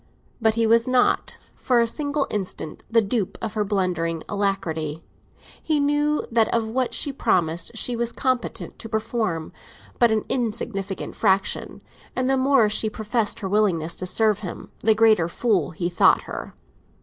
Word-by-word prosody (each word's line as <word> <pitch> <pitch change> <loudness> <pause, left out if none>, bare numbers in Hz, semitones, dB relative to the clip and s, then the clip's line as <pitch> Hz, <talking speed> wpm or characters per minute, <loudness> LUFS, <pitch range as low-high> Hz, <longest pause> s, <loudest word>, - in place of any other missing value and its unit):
But 220 -1 +3
he 230 0 +2
was 230 +2 +4
not 255 -1 +2 0.2
for 245 -2 +1
a 235 - +4
single 285 +3 -1
instant 185 -6 -4
the 230 -1 +4
dupe 205 -1 -2
of 220 -2 -4
her 215 -1 0
blundering 180 -5 -1
alacrity; 170 -7 -2 0.6
he 310 -2 +1
knew 295 +1 +1
that 225 -1 +3
of 230 -1 +1
what 250 +2 0
she 285 - +1
promised 170 -2 0
she 245 +2 0
was 235 0 0
competent 255 -1 -2
to 225 - -8
perform 220 -7 -2 0.5
but 235 - +5
an 220 -1 0
insignificant 215 -5 -3
fraction, 195 -2 0 0.3
and 255 0 0
the 270 - +3
more 265 -3 +4
she 215 +1 +1
professed 215 0 -2
her 195 - -2
willingness 185 -5 +1
to 185 - -3
serve 215 +2 +2
him, 185 -5 -8
the 220 0 +3
greater 215 -6 +4
fool 210 +3 0
he 175 +1 -3
thought 175 -1 +4
her. - - -7
220 Hz, 160 wpm, -23 LUFS, 190-235 Hz, 0.6 s, but